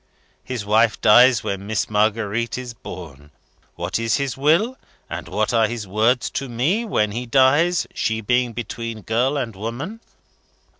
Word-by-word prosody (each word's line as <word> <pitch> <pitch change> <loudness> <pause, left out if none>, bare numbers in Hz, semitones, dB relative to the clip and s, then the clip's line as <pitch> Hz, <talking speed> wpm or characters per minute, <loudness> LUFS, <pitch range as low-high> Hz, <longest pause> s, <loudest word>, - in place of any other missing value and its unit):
His 125 -5 -5
wife 110 +2 +3
dies 120 +1 +6
when 100 0 -4
Miss 110 -1 -1
Marguerite 110 +2 0
is 125 -2 -6
born. 80 - -10 0.5
What - - -2
is 115 0 +1
his 140 -2 -2
will, 165 - +2 0.3
and - - -6
what - - -1
are 115 -2 +4
his 115 -3 -5
words 110 +6 +1
to 135 -1 -4
me, 145 - 0
when 105 - 0
he 120 +3 -4
dies, 140 +7 +3
she 110 -1 -1
being 125 +2 +1
between 115 -1 -6
girl 125 +7 0
and 120 -6 -3
woman? 120 - -5
115 Hz, 155 wpm, -21 LUFS, 110-130 Hz, 0.5 s, dies